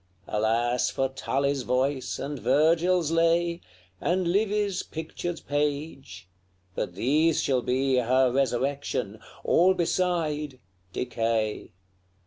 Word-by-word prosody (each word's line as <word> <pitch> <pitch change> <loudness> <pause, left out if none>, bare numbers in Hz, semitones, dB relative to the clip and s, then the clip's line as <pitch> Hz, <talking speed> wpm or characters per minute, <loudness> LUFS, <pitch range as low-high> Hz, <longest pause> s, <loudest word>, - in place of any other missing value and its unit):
Alas 115 +3 +1
for 135 0 -1
Tully's 135 +1 -1
voice, 130 +2 -1
and 145 -1 -5
Virgil's 160 +6 +2
lay, 170 +1 +2 0.4
And 180 0 0
Livy's 205 0 +1
pictured 165 +2 -6
page! 145 - -3 0.5
But 85 - -4
these 150 - +2
shall 130 -2 +1
be 130 +1 +1
Her 125 +1 +3
resurrection; 130 -4 -1 0.2
all 185 +3 +4
beside 160 -6 -1 0.3
decay. 115 -2 -2
140 Hz, 100 wpm, -26 LUFS, 125-165 Hz, 0.5 s, all